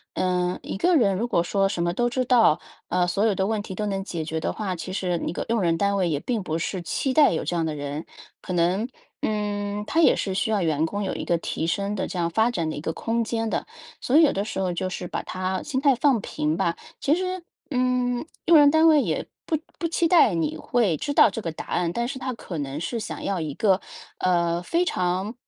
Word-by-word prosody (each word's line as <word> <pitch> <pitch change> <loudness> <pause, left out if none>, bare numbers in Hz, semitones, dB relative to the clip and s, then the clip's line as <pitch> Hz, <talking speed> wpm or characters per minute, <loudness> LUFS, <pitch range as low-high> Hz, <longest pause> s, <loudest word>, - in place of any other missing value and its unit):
呃， 180 -1 0
一 - - -4
个 350 - +3
人 200 -8 +3
如 225 +6 -1
果 170 -8 +2
说 195 +2 +1
什 170 - -1
么 175 0 0
都 240 +4 +1
知 255 +1 -1
道， 230 -10 +5 0.3
呃， 180 0 +2
所 180 +4 0
有 215 -3 +3
的 190 - 0
问 215 0 0
题 190 -2 -7
都 210 +2 -2
能 195 -1 -2
解 170 -5 -4
决 160 0 -2
的 - - -1
话， 195 -4 -3
其 180 +2 -6
实 180 -3 -1
你 - - -3
个 - - -4
用 230 -2 +1
人 165 -2 +2
单 200 +2 +1
位 180 -3 +1
也 145 -2 0
并 235 +2 -2
不 160 -3 -2
是 180 +2 -3
期 260 +9 -1
待 295 +1 +5
有 - - -1
这 175 - -1
样 165 -1 0
的 155 - -3
人。 145 +2 -5 0.3
可 185 - -5
能 180 +6 +1 0.4
嗯， 205 -1 -2
它 325 - +2
也 - - +6
是 190 -2 -2
需 220 +3 0
要 210 -3 +1
员 160 -1 +1
工 205 +4 -3
有 190 - -2
一 - - -4
个 170 - +2
提 160 - -3
升 200 +5 -1
的 190 - -2
这 180 - -4
样 170 - +1
发 220 +7 +2
展 170 -8 -1
的 - - -4
一 145 - -5
个 160 - -2
空 230 0 -1
间 225 0 -2
的， - - -2 0.3
所 265 - +2
以 330 - +8
有 300 - +5
的 200 +2 -1
时 190 - -4
候 185 -2 0
就 185 +2 -2
是 180 -1 -5
把 - - -4
它 185 0 -3
心 270 -3 -2
态 280 -3 +4
放 245 -4 +2
平 150 +1 -1
吧。 170 - 0 0.2
其 290 - +2
实， 370 +1 -3 0.3
嗯， 250 0 +1 0.2
用 335 - +6
人 290 -1 +7
单 315 +2 +5
位 305 -2 +6
也 170 - -1 0.2
不 315 - +1 0.2
不 335 - 0
期 335 0 +1
待 315 - +5
你 155 -2 -1
会 210 -3 +1
知 285 - -3
道 205 - +7
这 225 - -4
个 165 - -3
答 160 - -8
案， 175 -1 0
但 235 +6 -1
是 260 0 -5
它 255 0 -3
可 175 -8 -6
能 140 +1 -4
是 230 +8 -3
想 - - -6
要 195 -2 -1
一 150 -3 -4
个， 195 -1 +2 0.4
呃， 170 -1 +1
非 340 - 0
常 185 - -1
195 Hz, 275 characters per minute, -25 LUFS, 175-240 Hz, 0.4 s, 以